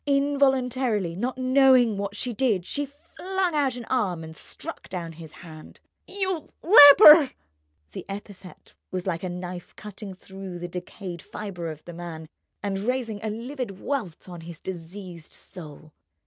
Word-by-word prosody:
Involuntarily, 265 Hz, -8 st, +1 dB
not 250 Hz, +7 st, -3 dB
knowing 255 Hz, -3 st, +4 dB
what 200 Hz, 0 st, -4 dB
she 245 Hz, +2 st, -3 dB
did, 215 Hz, -6 st, +1 dB
she 290 Hz, +6 st, -2 dB
flung 355 Hz, +5 st, -3 dB
out 280 Hz, -4 st, +1 dB
an 245 Hz, -2 st, -7 dB
arm 195 Hz, -11 st, -1 dB
and 160 Hz, 0 st, -10 dB
struck -, -, -9 dB
down 175 Hz, -3 st, -5 dB
his 160 Hz, -1 st, -11 dB
hands. 155 Hz, -2 st, -12 dB, 0.3 s
"You—leper!" 330 Hz, -5 st, +7 dB, 0.6 s
The -, -, -7 dB
epithet 195 Hz, -2 st, -10 dB, 0.2 s
was 185 Hz, -1 st, -4 dB
like 170 Hz, -3 st, -2 dB
a 185 Hz, -, -4 dB
knout 180 Hz, 0 st, -7 dB
cutting 210 Hz, -2 st, -9 dB
through 190 Hz, -1 st, -9 dB
the 175 Hz, 0 st, -5 dB
decayed 180 Hz, 0 st, -7 dB
fibre 180 Hz, -5 st, -6 dB
of 155 Hz, -1 st, -9 dB
the 175 Hz, -, -9 dB
man 165 Hz, -2 st, -8 dB, 0.4 s
and 195 Hz, -1 st, -2 dB
raising 225 Hz, -1 st, -2 dB
a 220 Hz, -, -2 dB
livid 235 Hz, -2 st, -5 dB
welt 225 Hz, -, -4 dB
on 175 Hz, -2 st, -9 dB
his 165 Hz, -1 st, -10 dB
diseased 175 Hz, -1 st, -9 dB
soul. 155 Hz, -3 st, -12 dB
200 Hz, 150 wpm, -25 LUFS, 175-260 Hz, 0.6 s, You—leper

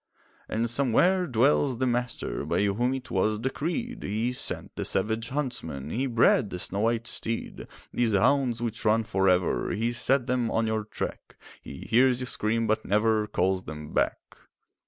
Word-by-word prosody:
And 115 Hz, +2 st, 0 dB
somewhere 140 Hz, +10 st, +2 dB
dwells 130 Hz, +1 st, +2 dB
the 130 Hz, -, 0 dB
Master, 125 Hz, -1 st, -2 dB
By -, -, 0 dB
whom 110 Hz, +5 st, +1 dB
it 130 Hz, -, -8 dB
was 105 Hz, +3 st, +1 dB
decreed; 170 Hz, -, -3 dB
He 110 Hz, +5 st, -1 dB
sent -, -, -4 dB
the -, -, -3 dB
savage 110 Hz, +4 st, 0 dB
huntsman, 80 Hz, -, -4 dB
He 130 Hz, +4 st, -1 dB
bred 120 Hz, -1 st, +3 dB
the 90 Hz, -, -5 dB
snow 95 Hz, +2 st, -3 dB
white 115 Hz, +1 st, +1 dB
steed. 115 Hz, -1 st, -4 dB, 0.3 s
These 120 Hz, -3 st, +1 dB
hounds 120 Hz, +3 st, +2 dB
which 115 Hz, -1 st, -3 dB
run 110 Hz, +1 st, +3 dB
for 95 Hz, -3 st, +1 dB
ever, 90 Hz, -1 st, +1 dB
He 115 Hz, +3 st, 0 dB
set 125 Hz, +2 st, +1 dB
them 125 Hz, -2 st, 0 dB
on 115 Hz, +1 st, +1 dB
your 110 Hz, -1 st, -1 dB
track; 110 Hz, -, -6 dB, 0.3 s
He 70 Hz, -, -9 dB
hears 125 Hz, +1 st, +4 dB
you 125 Hz, -, -3 dB
scream, 115 Hz, -1 st, -1 dB
but 110 Hz, 0 st, 0 dB
never 105 Hz, +1 st, +2 dB
Calls 95 Hz, -2 st, 0 dB
them 75 Hz, -1 st, -8 dB
back. -, -, +1 dB
115 Hz, 170 wpm, -27 LUFS, 105-125 Hz, 0.3 s, hears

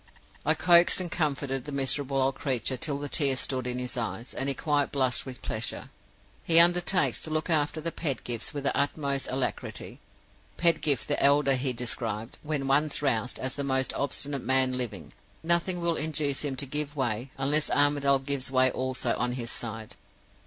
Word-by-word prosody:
"I 155 Hz, -, +4 dB
coaxed 170 Hz, +3 st, +6 dB
and 175 Hz, -2 st, -4 dB
comforted 140 Hz, -5 st, -1 dB
the 150 Hz, -, -6 dB
miserable 140 Hz, 0 st, 0 dB
old 135 Hz, +1 st, +2 dB
creature 130 Hz, -2 st, -1 dB
till 140 Hz, +3 st, -3 dB
the 145 Hz, 0 st, -5 dB
tears 135 Hz, -2 st, +2 dB
stood 130 Hz, -2 st, -2 dB
in 125 Hz, 0 st, -3 dB
his 125 Hz, 0 st, -4 dB
eyes, 115 Hz, +1 st, -4 dB
and 135 Hz, -, -1 dB
he 135 Hz, -, 0 dB
quite 145 Hz, 0 st, 0 dB
blushed 130 Hz, -2 st, 0 dB
with 130 Hz, 0 st, -9 dB
pleasure. 110 Hz, -1 st, -4 dB, 0.5 s
He 165 Hz, -, +2 dB
undertakes 175 Hz, +2 st, +4 dB
to -, -, -6 dB
look 155 Hz, +2 st, -2 dB
after 155 Hz, 0 st, +1 dB
the 165 Hz, +2 st, -3 dB
Pedgifts 125 Hz, -8 st, -2 dB
with 145 Hz, -3 st, -5 dB
the -, -, +1 dB
utmost 140 Hz, -1 st, -1 dB
alacrity. 130 Hz, 0 st, -4 dB, 0.6 s
Pedgift 155 Hz, -5 st, +2 dB
the 145 Hz, -, 0 dB
elder 140 Hz, 0 st, +5 dB
he 130 Hz, 0 st, 0 dB
described, 115 Hz, -2 st, -4 dB
when 150 Hz, -2 st, -3 dB
once 145 Hz, +2 st, +2 dB
roused, 125 Hz, -3 st, 0 dB
as 130 Hz, 0 st, -2 dB
the 140 Hz, -, -4 dB
most 130 Hz, -1 st, 0 dB
obstinate 140 Hz, -1 st, -1 dB
man 130 Hz, 0 st, +3 dB
living; 105 Hz, -, -5 dB, 0.3 s
nothing 170 Hz, +2 st, +1 dB
will 170 Hz, -1 st, +1 dB
induce 150 Hz, -2 st, -1 dB
him 140 Hz, -2 st, -2 dB
to 140 Hz, -, 0 dB
give 145 Hz, +2 st, -3 dB
way, 125 Hz, -2 st, -2 dB
unless 145 Hz, +3 st, +1 dB
Armadale 145 Hz, -1 st, +3 dB
gives 135 Hz, 0 st, -2 dB
way 130 Hz, -1 st, +3 dB
also 130 Hz, -2 st, -2 dB
on 125 Hz, 0 st, -1 dB
his 120 Hz, -2 st, -4 dB
side. 110 Hz, -2 st, -5 dB
140 Hz, 180 wpm, -27 LUFS, 130-150 Hz, 0.6 s, coaxed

